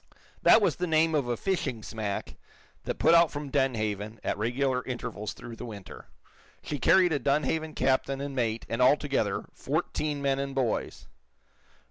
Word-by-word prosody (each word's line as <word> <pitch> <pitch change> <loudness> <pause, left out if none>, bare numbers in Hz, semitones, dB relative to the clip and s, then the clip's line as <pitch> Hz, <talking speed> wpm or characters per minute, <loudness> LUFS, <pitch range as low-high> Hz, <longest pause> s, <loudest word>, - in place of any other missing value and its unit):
That 225 - +6
was - - +2
the 180 - -1
name 160 0 +3
of 145 -5 +1
a 120 -1 -1
fishing 135 - -2
smack 105 -3 -4 0.5
that - - -3
put 165 - +4
out 170 -1 +6
from 145 -1 -6
Dunhaven 110 -6 -1
at - - -1
regular 125 +4 0
intervals 120 -4 -5
through 115 -1 -10
the - - -7
winter. 100 -4 -10 0.6
She 145 - -4
carried 180 +5 +5
a 145 - +1
Dunhaven 150 +3 0
captain 135 +1 +1
and 140 -1 -5
mate, 115 -3 -1
and, 115 +2 -2
altogether, 140 +2 +2
fourteen 150 -1 -2
men 135 -1 0
and 140 -1 -3
boys. 125 -4 -1
135 Hz, 160 wpm, -28 LUFS, 115-150 Hz, 0.6 s, That